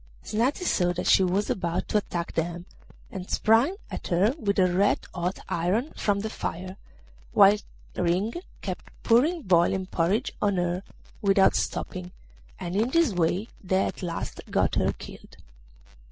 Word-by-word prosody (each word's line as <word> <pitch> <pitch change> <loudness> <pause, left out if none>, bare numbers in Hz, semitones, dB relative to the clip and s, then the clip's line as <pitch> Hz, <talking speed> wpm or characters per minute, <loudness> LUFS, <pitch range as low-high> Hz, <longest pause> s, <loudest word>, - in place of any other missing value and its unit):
Snati 245 - 0
saw 180 - +2
that 180 - -4
she 190 - +5
was 190 +3 +1
about 170 -2 -2
to 210 - +2
attack 175 -4 -4
them, 170 +1 -2 0.5
and 185 -1 -7
sprang 230 - +3 0.2
at - - -5
her 190 +7 +3
with 200 -5 0
a 185 -2 +3
red 200 +3 +3 0.2
hot 180 +1 -2
iron 190 - 0
from 200 -1 0
the 220 - -3
fire, 185 0 -5 0.6
while 200 0 +7 0.4
Ring 180 +5 0 0.3
kept - - -5
pouring 295 +8 +3
boiling 185 0 +3
porridge 185 +7 0
on 200 -1 +2
her 175 0 0 0.4
without 195 -1 +4
stopping, 180 -1 -3 0.5
and 175 +1 -4
in 220 +4 +2
this 325 -5 +3
way 175 +4 0 0.2
they 190 +1 +2
at - - -5
last 175 -2 -4
got - - +1
her - - +2
killed. - - -12
190 Hz, 155 wpm, -26 LUFS, 175-215 Hz, 0.6 s, while